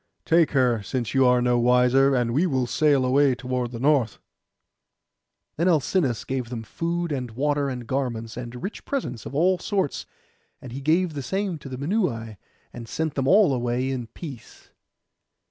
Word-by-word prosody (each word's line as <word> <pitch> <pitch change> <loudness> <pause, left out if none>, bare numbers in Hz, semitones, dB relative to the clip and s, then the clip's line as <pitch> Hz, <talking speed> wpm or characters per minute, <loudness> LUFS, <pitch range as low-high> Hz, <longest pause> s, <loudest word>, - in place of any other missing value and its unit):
Take 165 -1 +4
her, 125 -5 +2
since 120 +2 -3
you 135 -1 +4
are 125 0 +3
no 125 -1 +2
wiser; 125 +3 +4
and 120 -2 0
we 165 +8 +2
will 130 -5 0
sail 140 +1 +2
away 135 +1 +3
toward 125 0 -3
the 120 -1 -7
north.' 135 -4 +2 1.4
Then 170 +4 +1
Alcinous 155 - +1
gave 130 -3 -3
them 120 -2 -5
food, 170 +7 -3
and 130 -4 -3
water, 145 +4 0
and 125 -2 -5
garments, 120 -4 -3
and 120 0 -7
rich 200 - -5
presents 125 - -4
of - - -8
all 180 +4 +3
sorts; 195 -8 -2 0.5
and 135 -4 -10
he 135 +3 -6
gave 165 +4 +2
the 145 - -4
same 190 +2 -2
to 140 - -10
the 130 - -6
Minuai, 135 - -2 0.4
and 115 -1 -9
sent 160 -2 -2
them 135 -1 -1
all 195 -3 +5
away 125 +1 -1
in 125 -3 -4
peace. 135 -3 -11
130 Hz, 175 wpm, -24 LUFS, 125-155 Hz, 1.4 s, all